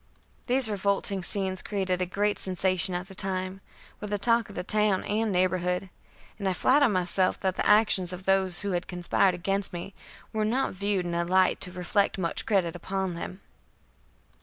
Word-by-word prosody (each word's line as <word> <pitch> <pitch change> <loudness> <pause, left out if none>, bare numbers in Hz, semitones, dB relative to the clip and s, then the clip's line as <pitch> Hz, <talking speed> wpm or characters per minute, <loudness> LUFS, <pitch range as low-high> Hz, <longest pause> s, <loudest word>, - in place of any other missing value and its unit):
These 255 -1 +2
revolting 200 -1 -1
scenes 190 0 -1
created 190 -3 -2
a 180 - 0
great 205 +3 0
sensation 185 -1 0
at 180 +2 -4
the 195 - -11
time, 190 0 -1 0.4
were 210 - -6
the 205 0 -1
talk 230 +1 +2
of 200 - -11
the 180 - -3
town 210 -1 +2
and 215 +1 -1
neighborhood, 180 0 0 0.5
and 195 -2 0
I - - 0
flatter 270 +7 +4
myself 185 -1 +1
that 190 -1 0
the - - -1
actions 210 -4 +4
of 180 +1 -7
those 190 -2 +2
who 200 -1 -2
had 175 -1 -2
conspired 180 +1 +1
against 195 +2 -1
me 175 +3 -7 0.4
were 215 -1 0
not 250 +5 0
viewed 200 -1 -1
in 175 - -3
a 170 0 0
light 185 +1 +2
to 180 - -2
reflect 185 +3 0
much 170 -3 -2
credit 185 -6 +1
upon 190 +1 -3
them. 185 +3 -7
190 Hz, 185 wpm, -27 LUFS, 180-205 Hz, 0.5 s, flatter